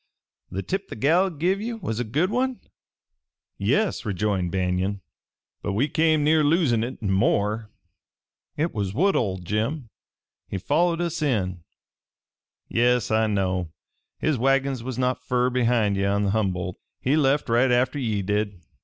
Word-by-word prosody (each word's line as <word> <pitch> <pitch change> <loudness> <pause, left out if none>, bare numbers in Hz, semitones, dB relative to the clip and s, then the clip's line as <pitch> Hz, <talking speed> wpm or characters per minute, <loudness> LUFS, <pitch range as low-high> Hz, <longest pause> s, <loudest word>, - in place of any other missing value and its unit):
"The 95 +1 -4
tip 195 +1 -3
the - - -7
gal 165 - +3
give 180 +5 0
ye 235 +2 -3
was 150 - -4
a - - +1
good 150 - 0
one?" 255 +1 0 1.0
"Yes," 215 -3 +1
rejoined 100 -4 -1
Banion. 95 +1 -1 0.6
"But 100 - -2
we 120 +9 +2
came 155 0 +2
near 155 +1 +4
losing 145 -7 +3
it 120 +3 -4
and 95 -2 +1
more. 105 +3 +1 0.9
It 160 +3 0
was 100 -3 -3
Woodhull, 125 - +2
Jim. 110 - -2 0.6
He 100 - -4
followed 170 - +1
us 170 -1 -2
in." 95 - -1 1.0
"Yes, 120 -1 +2
I 110 0 +3
know. 95 -4 -1 0.5
His 155 -6 0
wagons 135 0 +1
was 125 0 -5
not 130 0 0
fur 125 0 +1
behind 120 -4 +2
ye 100 - 0
on 100 +1 +1
the 100 - +1
Humboldt. 95 -4 -1 0.2
He 135 +3 +1
left 145 -1 +2
right 120 +3 +3
atter 125 +3 +2
ye 110 -6 -1
did. 105 -1 -1
120 Hz, 155 wpm, -24 LUFS, 100-150 Hz, 1.0 s, near